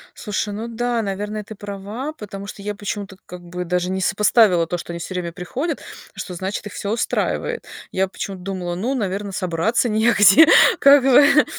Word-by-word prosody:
Слушай, 205 0 -3
ну 225 +3 -5
да, 235 0 -1
наверное, 210 +1 -4
ты 220 - -10
права, 205 +7 -6
потому 200 -6 -8
что 200 - -9
я 205 +1 -4
почему-то 200 -1 -6
как 180 0 -10
бы 180 +1 -6
даже 180 +1 -1
не 190 0 -2
сопоставила 200 -4 +3
то, 175 - -2
что 175 - -8
они 170 - -6
всё 185 - -6
время 170 -2 -3
приходят, 250 - -4 0.4
что, 185 - -6
значит, 190 +4 -4
их - - -10
всё 200 - -4
устраивает. 460 - -2 0.3
Я 190 0 0
почему-то 190 0 -7
думала: 180 -2 -4
"Ну, 230 +9 -2
наверно, 200 -2 -3
собраться 185 +6 0
негде, 225 +7 +6 0.3
как 280 -1 +7
бы, 280 +3 +6
205 Hz, 180 wpm, -21 LUFS, 185-225 Hz, 0.4 s, как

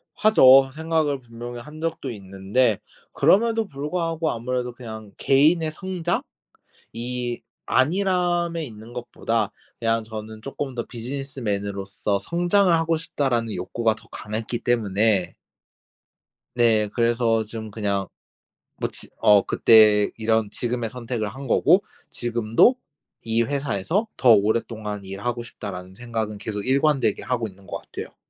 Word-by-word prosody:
하죠. 135 - +7
생각을 160 -2 0
분명히 120 0 -8
한 150 +6 -11
적도 165 -4 -3
있는데 100 +3 0 0.3
그럼에도 225 +1 +3
불구하고 165 +2 -2
아무래도 125 +1 -2
그냥 110 -4 -9
개인의 155 +4 +3
성장이 175 0 -4 1.2
안일함에 175 +2 +1
있는 110 -2 -11
것보다 115 -3 -2 0.3
그냥 115 -1 +1
저는 110 0 -8
쪼끔 135 0 -5
더 120 -2 -3
'비즈니스맨으로서 105 -6 -3
성장을 175 - +2
하고 165 0 +2
싶다.'라는 125 -8 -1
욕구가 115 -2 0
더 - - -16
강했기 110 +3 -4
때문에 105 -4 +1 1.2
네. 110 -3 +4
그래서 115 0 +1
좀 110 0 -7
그냥 100 -2 -2 0.7
뭐 - - -1
지 - - -6
어 105 -1 +6
그때 105 -2 +5
이런 110 -1 +1
지금의 120 0 -2
선택을 120 -3 -3
한 135 +6 -8
거고 - - +4 0.3
지금도 120 - +2 0.5
'이 115 0 +1
회사에서 140 - -1
더 125 - +6
오랫동안 105 0 0
일하고 100 +6 -4
싶다.'라는 95 -5 -8
생각은 110 -2 -4
계속 105 0 -4
일관되게 135 -4 +2
하고 120 -3 -1
있는 95 -1 -16
것 - - -5
같아요. - - -9
120 Hz, 290 characters per minute, -24 LUFS, 110-145 Hz, 1.2 s, 하죠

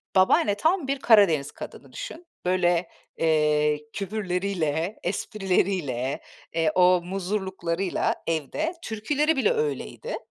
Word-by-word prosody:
Babaanne, 195 +2 +4
tam 320 - +1
bir 275 0 -1
Karadeniz 185 - +4
kadını - - -10
düşün. 355 -9 -8 0.2
Böyle, 175 -1 +2 0.3
eee, 150 -2 +2
küfürleriyle, 185 -3 -2
esprileriyle, 180 - -1 0.3
eee, 160 -1 +2
o 180 -1 +5
muzurluklarıyla 190 -1 -2
evde. 165 - -1
Türküleri 290 +8 0
bile 435 - +3
öyleydi. 455 +1 -3
185 Hz, 100 wpm, -25 LUFS, 165-220 Hz, 0.3 s, o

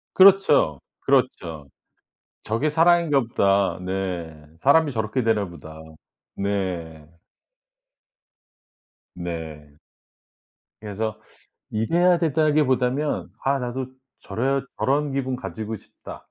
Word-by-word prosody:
그렇죠. 185 - +6 0.2
그렇죠. 80 -4 0 0.8
'저게 115 +8 0
사랑인가 165 -2 +4
보다.' 100 -5 +1
네. 90 -4 -4 0.2
'사람이 145 +2 +4
저렇게 110 +3 -1
되나 110 -3 +1
보다.' 80 -2 -11 0.6
네. 90 -6 -3 2.1
네. 80 -4 -7 1.1
그래서 110 +1 -4 0.5
이래야 170 +11 +2
된다기보다는 150 -3 +1
'아 135 0 +2
나도 125 +1 -3 0.3
저래야 130 +7 -1 0.2
저런 145 +1 +1
기분 130 -2 -2
가지고 110 +1 -5
싶다.' - - -12
110 Hz, 200 characters per minute, -23 LUFS, 90-140 Hz, 2.1 s, 그렇죠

